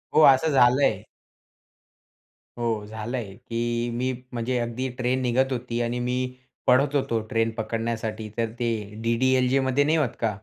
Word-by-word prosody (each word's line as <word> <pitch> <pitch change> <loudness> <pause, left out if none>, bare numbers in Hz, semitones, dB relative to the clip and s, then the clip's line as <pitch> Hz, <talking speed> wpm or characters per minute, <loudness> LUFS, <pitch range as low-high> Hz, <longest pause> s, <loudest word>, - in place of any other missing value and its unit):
हो, 155 - +7
असं 140 +3 +5
झालंय. 130 +1 +4 1.6
हो 115 -3 -1
झालंय 110 -1 -5
की 120 +1 -2
मी 125 +2 -1 0.2
म्हणजे 120 +2 -1
अगदी 120 +2 -2
ट्रेन 125 +1 0
निघत 130 +2 +1
होती. 120 -1 -2
आणि 120 +1 -1
मी 125 +1 -2 0.3
पळत 140 +3 +4
होतो 115 -4 +1
ट्रेन 115 0 +1
पकडण्यासाठी, 110 -1 -3
तर 115 -1 0
ते 120 - +1 0.3
डी-डी-एल-जेमध्ये 130 +3 +2
नाही 155 +2 +2
होत 140 -6 +2
का? 115 - +1
120 Hz, 140 wpm, -25 LUFS, 115-130 Hz, 1.6 s, हो